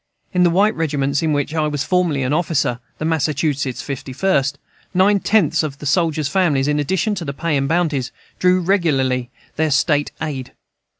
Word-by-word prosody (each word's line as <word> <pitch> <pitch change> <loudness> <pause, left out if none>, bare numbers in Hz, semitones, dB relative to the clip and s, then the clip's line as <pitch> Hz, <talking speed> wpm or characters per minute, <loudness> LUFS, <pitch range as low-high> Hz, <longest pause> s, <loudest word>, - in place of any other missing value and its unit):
In 180 - +2
the 175 - +5
white 200 +5 +3
regiment 140 -3 0
in 160 -1 0
which 145 +1 -1
I 155 -1 +1
was 145 -2 -2
formerly 175 -7 +1
an 130 +3 0
officer 155 -7 0 0.2
(the 155 - -4
Massachusetts 145 -4 -1
Fifty 135 -1 -6
First) 140 -3 +1 0.4
nine 200 +2 +4
tenths 180 -7 +2
of 145 -4 -4
the 150 - -9
soldiers' 155 -1 +1
families, 145 -4 +1
in 150 0 +1
addition 190 +8 0
to 180 -4 -4
the 140 - -4
pay 165 +2 -1
and 135 -1 0
bounties, 155 -7 0 0.3
drew 185 0 +3
regularly 135 -10 +1 0.3
their 160 0 +1
"State 145 +1 +2
aid." 145 -5 -5
155 Hz, 180 wpm, -19 LUFS, 140-175 Hz, 0.4 s, the